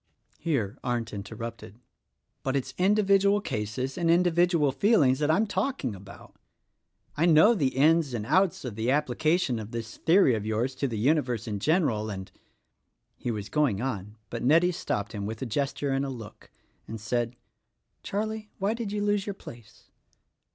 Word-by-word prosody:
Here 135 - -1
Arndt 120 -2 -2
interrupted: 110 +1 -7 0.6
"But 135 0 -1
it's 135 - -2
individual 200 +1 +4
cases 125 - -3
and 170 -1 +1
individual 175 -3 +3
feelings 145 - +3
that 150 0 +1
I 160 - +5
am 220 - +2
talking 205 - -2
about. 100 0 -13 0.8
I 165 +4 +2
know 170 +8 +6
the 140 - 0
ins 150 -1 +3
and 105 -2 -3
outs 180 - +2
of 125 - -4
the 110 +3 -2
application 150 0 +1
of 110 -1 -7
this 115 -1 -6
theory 170 -5 +4
of 110 -2 -2
yours 110 +5 -1
to 140 - 0
the 115 -3 -4
universe 125 -2 +1
in 105 -2 -3
general, 120 - +1
and 95 -2 -6 0.3
— - - -50
" - - -50
He - - -1
was 105 -3 -3
going 130 -5 +1
on, 105 -4 -4
but 115 - -4
Nettie 165 +8 +4
stopped 105 - -3
him 100 -2 -4
with 110 +3 -5
a - - -2
ges 135 +4 -1
ture 140 -1 -3
and 135 +1 0
a 140 - -3
look, 115 -5 -10 0.4
and 110 - -6
said, 120 +3 -2 0.7
"Charlie, 215 +1 -3
why 200 +3 0
did 230 -3 -4
you 205 0 -1
lose 205 -1 0
your 200 - -3
place?" 115 - -14
135 Hz, 180 wpm, -27 LUFS, 110-175 Hz, 0.8 s, know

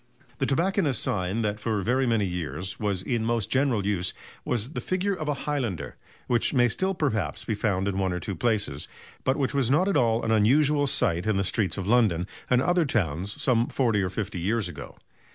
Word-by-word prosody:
The 135 - +1
tobacconists' 165 - +1
sign 95 +4 -1
that 105 0 -1
for 105 -2 -1
very 130 +5 +1
many 115 -3 +2
years 90 0 -4
was 100 -4 -1
in 120 -3 -1
most 115 -3 -1
general 130 -7 +2
use 95 -3 0 0.3
was 120 +2 -2
the - - -4
figure 185 +2 -1
of 155 -5 -5
a 150 - 0
highlander, 120 - -2 0.3
which 120 +3 +1
may 120 -1 +4
still 190 - 0
perhaps 110 - -1
be 115 - -1
found 100 -2 0
in 100 -1 -1
one 95 -1 +1
or 90 - -2
two 100 - -4
places, 100 - -1 0.4
but 130 +2 +1
which 140 -1 0
was 135 -4 +2
not 155 +8 +3
at 200 - +2
all 115 -1 +2
an 110 - 0
unusual 145 +7 +3
sight 85 -6 +1
in 110 - +2
the 100 - +1
streets 95 -2 0
of 95 - -3
London 105 -6 +3 0.2
and 125 0 +3
other 175 +1 +3
towns 95 - -1
some 120 -1 +2
forty 115 -6 +1
or 95 - -1
fifty 105 0 -4
years 105 +3 0
ago. 70 -5 -9
110 Hz, 205 wpm, -26 LUFS, 95-130 Hz, 0.4 s, may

